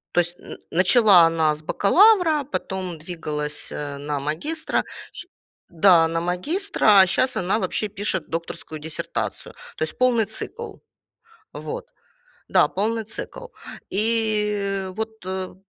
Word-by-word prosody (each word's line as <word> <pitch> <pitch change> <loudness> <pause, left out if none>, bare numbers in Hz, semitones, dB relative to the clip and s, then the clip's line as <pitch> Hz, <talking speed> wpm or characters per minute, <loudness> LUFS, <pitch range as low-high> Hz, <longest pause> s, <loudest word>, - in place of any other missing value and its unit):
То - - +6
есть 175 0 -2
н - - -10
начала 185 0 +6
она 160 -2 +2
с 150 - -10
бакалавра, 330 - +4
потом 190 - -4
двигалась, 155 -3 -3
э, 145 -1 -5
на 145 0 -3
магистра 170 - -2 0.3
ш - - -9 0.4
Да, 170 -1 +5
на 165 0 -2
магистра, 210 - +2
а 190 - +7
щас 255 +8 +1
она 190 +4 0
вообще 215 -1 -1
пишет 195 -2 -2
докторскую 165 -1 -6
диссертацию. 155 0 -5 0.2
То - - -1
есть 155 - -4
полный 245 -3 +3
цикл. 420 - -6 0.8
Вот. 485 +2 -7 0.6
Да, - - +4
полный 220 +3 -2
цикл. 485 - -6 0.5
И 210 -2 0
вот, 220 -2 -6
э, 185 0 -4
190 Hz, 130 wpm, -23 LUFS, 165-225 Hz, 0.8 s, а